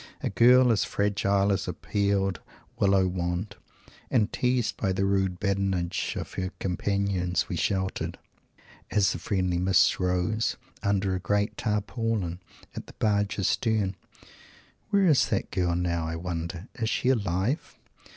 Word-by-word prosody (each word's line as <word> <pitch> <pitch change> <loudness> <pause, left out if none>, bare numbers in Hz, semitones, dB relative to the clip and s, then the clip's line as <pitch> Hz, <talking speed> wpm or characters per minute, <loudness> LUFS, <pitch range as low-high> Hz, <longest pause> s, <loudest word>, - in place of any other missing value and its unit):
a - - -1
girl 125 +5 +6
as 110 - +2
fragile 100 0 +1
as 95 -1 -1
a 90 - -2
peeled 100 0 0 0.4
Willow 95 -1 +4
wand 90 +3 -3 0.5
and 110 -4 +1
teased 125 -3 +1
by 95 - 0
the 95 +1 0
rude 95 -2 0
badinage 95 -3 -1
of - - -7
our 95 0 -1
companions 95 -1 -1
we - - -3
sheltered 95 +2 -1 0.7
as 105 -2 +3
the - - -4
friendly 90 -3 0
mists 95 0 +3
rose 90 +4 0 0.2
under 100 -1 +1
a 95 - -1
great 105 +3 0
Tarpaulin 105 -4 -2 0.4
at - - -7
the - - -13
barge's 105 -1 0
stern. 110 -4 0 0.9
Where 200 -2 +3
is 155 -7 +4
that - - -1
girl 90 -2 0
now, 85 -2 -1
I 80 - -3
wonder? 85 +2 -5
Is 115 -3 -2
she 125 - +1
alive? 105 - 0
100 Hz, 140 wpm, -27 LUFS, 90-105 Hz, 0.9 s, girl